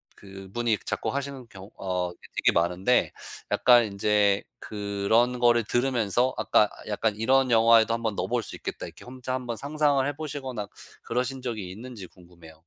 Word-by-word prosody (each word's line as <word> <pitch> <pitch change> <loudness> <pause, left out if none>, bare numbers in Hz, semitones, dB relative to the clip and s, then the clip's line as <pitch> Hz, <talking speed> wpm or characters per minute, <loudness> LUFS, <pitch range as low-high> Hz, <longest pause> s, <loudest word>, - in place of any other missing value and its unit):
그분이 100 +4 -3
작곡하시는 140 -2 -3
경우 95 -3 -12
어 90 -2 -2
그 - - -15 0.2
되게 - - +4
많은데 90 +8 +2 0.4
약간 120 -1 +6
인제 100 0 +2 0.2
그런 105 +4 0
거를 120 -1 +4
들으면서 120 0 +1
아까 110 -1 +3 0.2
약간 105 0 0
'이런 130 +4 +2
영화에도 115 0 +5
한번 115 -3 -2
넣어볼 - - -1
수 - - -6
있겠다.' - - -6
이렇게 - - -13
혼자 130 0 -6
한번 125 -3 -3
상상을 145 -1 +1
해보시거나 140 -7 -5 0.4
그러신 130 +2 -2
적이 110 -7 -5
있는지 110 -1 -9
궁금해요. 85 -2 -17
115 Hz, 355 characters per minute, -26 LUFS, 100-125 Hz, 0.4 s, 약간